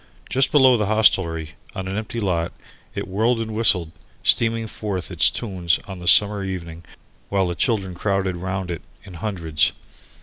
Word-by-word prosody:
Just 135 +1 +3
below 130 -4 +6
the 105 -2 0
hostelry, 90 -7 +3 0.2
on 95 0 -4
an 95 - -3
empty 110 +2 -4
lot, 85 -5 -1 0.4
it - - -4
whirled 110 +5 +1
and 110 -1 -4
whistled, 95 -7 +2 0.3
steaming 115 -1 +2
forth 100 -4 -5
its 85 -3 +4
tunes 90 -7 0
on 95 -2 -7
the 90 - -8
summer 105 +1 +5
evening 85 -3 -6 0.5
while 95 -2 +1
the 90 - -2
children 95 -1 0
crowded 95 0 -1
round 95 0 -4
it 85 - -5 0.2
in 95 - -12
hundreds. 85 -5 0
95 Hz, 165 wpm, -22 LUFS, 85-110 Hz, 0.5 s, below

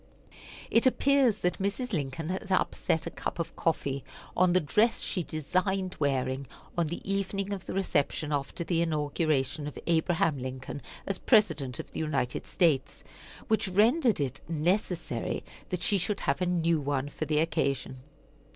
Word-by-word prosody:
It 230 +3 +5
appears 265 -4 +4
that 180 - 0
Mrs. 215 +5 -2
Lincoln 155 0 -2
had 190 +2 -4
upset 165 -3 +1
a - - -4
cup - - -4
of 170 - -4
coffee 140 -4 -1 0.3
on 185 0 +4
the 185 - +5
dress 210 +9 +2
she 185 - -1
designed 185 +5 -1
wearing 135 -2 0 0.3
on 170 -2 +1
the 170 +4 -6
evening 195 0 -1
of 190 -2 -6
the - - -4
reception 155 -5 0
after 145 +4 -2
the 170 -1 +1
inauguration 150 -2 0
of 150 - -7
Abraham 165 -3 +2
Lincoln 130 +2 -5 0.2
as 195 -2 -2
President 160 - +3
of - - -7
the - - -5
United 140 -6 -1
States, 160 -7 +1 0.4
which 220 -2 +2
rendered 225 - +3
it 135 -3 -2
necessary 165 - -1 0.3
that 180 -1 -2
she 200 - +3
should 200 +3 -1
have 140 +6 0
a 180 - +2
new 170 -2 +2
one 140 -1 -1
for 150 +2 -4
the 155 0 +1
occasion. 140 -4 0
165 Hz, 160 wpm, -29 LUFS, 145-195 Hz, 0.4 s, It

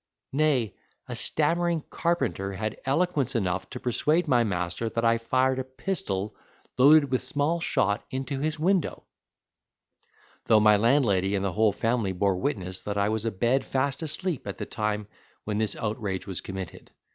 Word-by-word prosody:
Nay, 135 -7 +2 0.3
a 125 - -5
stammering 165 +6 0
carpenter 165 - -1
had 110 +2 -4
eloquence 140 -2 +1
enough 95 -3 -1
to - - -7
persuade 155 +8 +1
my 125 -4 +4
master 90 +1 -2
that 115 +1 -1
I 115 0 +3
fired 130 +3 +1
a - - -1
pistol 130 - -3 0.4
loaded 140 +1 +6
with 130 - +1
small 160 +1 +1
shot 100 -10 0
into 135 +1 -3
his 155 +2 -1
window; 175 +1 0 1.4
though 110 - +5
my 105 0 +6
landlady 105 -4 +3
and 100 0 -1
the 95 - -1
whole 110 -1 +3
family 115 -1 0
bore 95 0 +1
witness 95 -5 -2
that 100 0 -4
I 100 +1 +2
was 110 0 -1
abed 120 +5 +1
fast 135 +2 -1
asleep 160 - -3
at 100 - -5
the - - -4
time 105 -1 -2 0.4
when 105 0 -2
this 110 -2 +1
outrage 105 -4 -3
was 95 -3 -4
committed. 95 -3 -7
115 Hz, 160 wpm, -27 LUFS, 100-145 Hz, 1.4 s, loaded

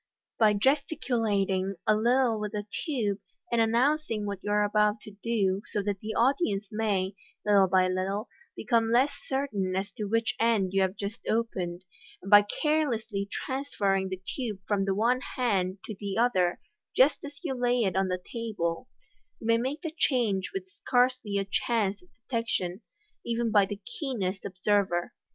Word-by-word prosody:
By 215 -2 +5
gesticulat 230 -5 +1
ing 190 +1 -1
a 215 - +5
little 235 +1 +2
with 210 0 -4
the 205 -1 -3 0.2
tube, 215 -9 0 0.3
in 235 - +2
announcing 230 0 +2
what 200 -2 -3
you - - -3
are 210 0 +3
about 210 +1 +2
to 210 - -10
do, 200 -5 +1
so 205 - -1
that 200 -1 -2
the 215 +2 -5
audience 235 - +2
may, 205 -3 0 0.3
little 200 -2 +5
by 185 0 +4
little, 190 +4 -1 0.3
become 230 -2 +1
less 260 +5 +4 0.2
certain 215 -9 -1
as 195 +1 -2
to 210 - -5
which 230 +2 +1
end 220 -5 +2
you 195 - +3
have 190 0 +1
just 205 +2 -4
opened, 185 -6 -1 0.4
and 195 - -8
by 205 0 +10
carelessly 230 -5 -1
transfer 260 -7 -1
ring 190 0 +1
the 190 -1 -4 0.2
tube 225 -7 -3
from 200 -2 +1
the 195 -1 0
one 240 +5 +2
hand 195 -7 +1
to 215 - -5
the 200 -1 -3
other 185 -7 +2 0.4
just 270 +3 +4
as 285 0 -9
you 295 -6 -1
lay 245 -1 +1
it 190 -3 0
on 190 0 +2
the 180 0 -1
table, 185 -5 -3 0.5
you - - -10
may 230 0 +4
make 270 +8 -3
the 325 -2 -4
change 230 - +1
with 385 -1 -5 0.2
scarcely 245 -5 +2
a 195 - 0
chance 205 0 0
of 360 - -23 0.2
detec 230 -2 0
tion, 180 +1 -2 0.4
even 235 -1 -1
by 205 -2 +5
the 205 0 -5 0.2
keenest 205 - -2
observer. 190 -2 0
210 Hz, 175 wpm, -28 LUFS, 195-240 Hz, 0.5 s, by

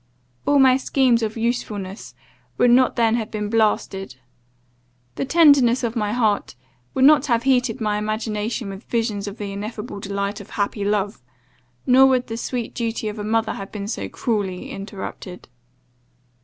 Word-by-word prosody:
All 285 - +4
my 260 -1 +6
schemes 260 -3 +2
of 220 0 -3
usefulness 215 -4 -3 0.4
would 245 - +4
not 255 +1 +4
then 230 -2 +2
have 220 -2 -3
been 210 -1 -4
blasted. 200 - 0 1.0
The - - -3
tenderness 275 -5 +5
of 235 0 -2
my 210 -3 -1
heart 215 - 0 0.4
would 265 - +4
not 295 0 +6
have 235 -3 +1
heated 255 -2 +2
my 210 -2 0
imagination 215 +1 -3
with 195 +3 -9
visions 220 -4 -2
of 200 +2 -7
the 205 -1 -5
ineffable 210 +1 -6
delight 200 +1 -3
of 205 - -13
happy 205 0 -1
love; 205 -6 -1 0.6
nor 265 +1 +6
would 255 -1 +2
the 225 - -5
sweet 240 0 -4
duty 225 -2 -2
of 210 +1 -7
a - - -4
mother 225 +1 0
have 195 - -8
been 200 -2 -5
so 220 - -4
cruelly 200 -6 -3
interrupted. 195 -2 -8
220 Hz, 160 wpm, -22 LUFS, 205-245 Hz, 1.0 s, my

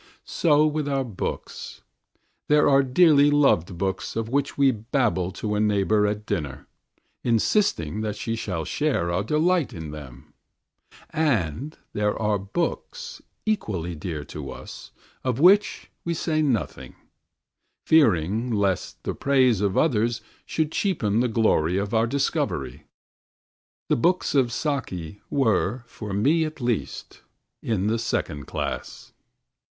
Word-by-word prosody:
So 150 -2 +3
with 150 -1 -1
our 135 -1 0
books. 110 -7 -6 0.6
There 150 0 +4
are 140 -1 +5
dearly 145 +2 +5
loved 135 - +3
books 95 +1 -2
of 115 0 -2
which 140 +2 -1
we 140 -1 +5
babble 110 -5 0
to 105 +2 -3
a 105 - 0
neighbour 105 0 +2
at 105 +1 -3
dinner, 75 -10 -3 0.6
insisting 115 - +1
that 105 -1 -2
she 115 - -3
shall 90 -8 -3
share 140 - 0
our 85 +2 +1
delight 160 - +1
in 80 -3 -7
them; 65 -4 -11 0.8
and 140 - -1 0.2
there 105 0 0
are 105 -2 +1
books, 175 - -4 0.2
equally 100 - -1
dear 80 -2 -5
to 70 -3 -7
us, - - -9 0.3
of 130 -1 -1
which 195 +6 +4
we 170 0 -2
say 155 -1 0
nothing, 130 -9 -2 0.9
fearing 110 - +3
lest 100 -4 -1
the - - -2
praise 130 -6 +2
of 100 -2 0
others 115 -5 +2 0.3
should 160 -1 -1
cheapen 115 - 0
the 125 - +2
glory 100 -7 +2
of 100 +2 -2
our 115 +1 +3
discovery. 115 - -2 1.0
The - - +2
books 175 +9 +1
of 130 -4 +3
"Saki" 105 - -3
were, 120 -2 +1
for 105 -3 -8
me 140 +12 +2
at 155 -1 -5
least, 115 - -3 0.4
in 100 -4 -1
the 110 +2 +1
second 75 - -2
class. - - -5
115 Hz, 135 wpm, -24 LUFS, 95-145 Hz, 1.0 s, are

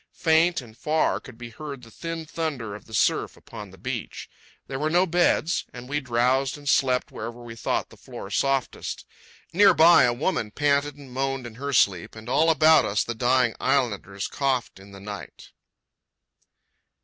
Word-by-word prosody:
Faint 165 0 +3
and 115 -3 -14
far 150 +6 0
could 130 -4 -13
be 120 -1 -9
heard 140 0 -8
the 115 - -14
thin 165 +2 -6
thunder 150 -9 -4
of 105 - -10
the 110 - -15
surf - - +1
upon - - -10
the - - -15
beach. - - -6 0.3
There 135 - -5
were 155 +2 0
no 175 +3 +3
beds; 175 -1 +1
and 125 0 -9
we 145 +2 -1
drowsed 130 +2 +1
and 145 -1 -12
slept 130 -2 +2
wherever 115 +2 -7
we 120 -1 -9
thought - - -2
the - - -15
floor - - -9
softest. 135 -2 -1 0.5
Near 195 0 +6
by, 165 -3 +7
a 120 - +2
woman 120 - -1
panted 145 +3 +1
and 140 -3 -13
moaned 135 -1 -2
in 120 - -8
her 140 +5 -5
sleep, 100 -9 +2
and 110 +1 -11
all 155 +6 +3
about 155 0 +6
us 105 +2 0
the 120 - -4
dying 125 0 +2
islanders 100 -7 -1
coughed 130 -7 -2
in 100 +1 -14
the 100 - -11
night. 100 +1 -9
135 Hz, 180 wpm, -25 LUFS, 115-155 Hz, 0.5 s, by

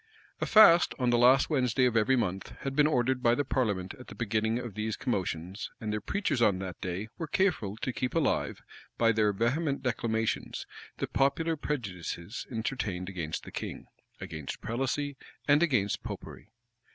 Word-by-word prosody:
[*] - - -31
A - - 0
fast, 180 -6 +7
on 125 -2 +1
the 120 - +4
last 130 +5 +5
Wednesday 125 -3 +2
of 125 -2 +1
every 115 +4 +4
month, 95 -6 -2
had 135 0 -3
been 150 0 +5
ordered 130 -2 +1
by 120 -1 +4
the 145 - 0
parliament 105 -9 -1
at 125 - -11
the - - -10
beginning 110 0 0
of 120 -3 -5
these 110 +2 -3
commotions; 95 -3 -3
and 105 -1 -3
their 105 - -2
preachers 170 - -1
on 105 -5 +4
that 95 -1 -6
day 95 +3 -3
were 165 - -3
careful 150 - 0
to 125 - -3
keep 125 +7 -2
alive, 160 -4 0 0.3
by 115 -1 +4
their 110 -1 +3
vehement 135 +8 0
declamations, 115 -3 -1 0.3
the - - -1
popular 160 +4 +1
prejudices 100 - -4
entertained 110 -6 -3
against 85 -5 -4
the - - -10
king, - - -6 0.3
against 80 -3 -6
prelacy, 135 +4 -2 0.3
and 145 +1 +5
against 125 - +1
Popery. - - -8
120 Hz, 175 wpm, -30 LUFS, 105-135 Hz, 0.3 s, fast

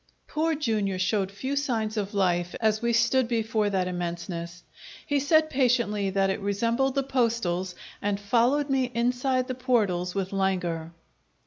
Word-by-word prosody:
Poor 320 +1 0
Jr. 215 -9 -1
showed 195 +1 0
few 260 +8 -3
signs 230 -6 -1
of 205 -1 -3
life 175 -2 +1
as 220 -1 +1
we 235 0 +1
stood 235 +2 +3
before 220 -2 0
that 190 -2 0
immenseness; 175 0 -5 0.4
he 290 -1 +1
said 310 +3 +4
patiently 235 -7 +1
that 195 0 +1
it 190 - -3
resembled 230 +7 0
the 275 - +1
postals, 225 -9 0 0.3
and 205 -1 -1
followed 245 +7 +2
me 270 -2 +2
inside 250 +2 +1
the 255 - -2
portals 210 -9 0
with 195 0 -2
languor. 180 -4 -1
220 Hz, 150 wpm, -27 LUFS, 190-255 Hz, 0.4 s, said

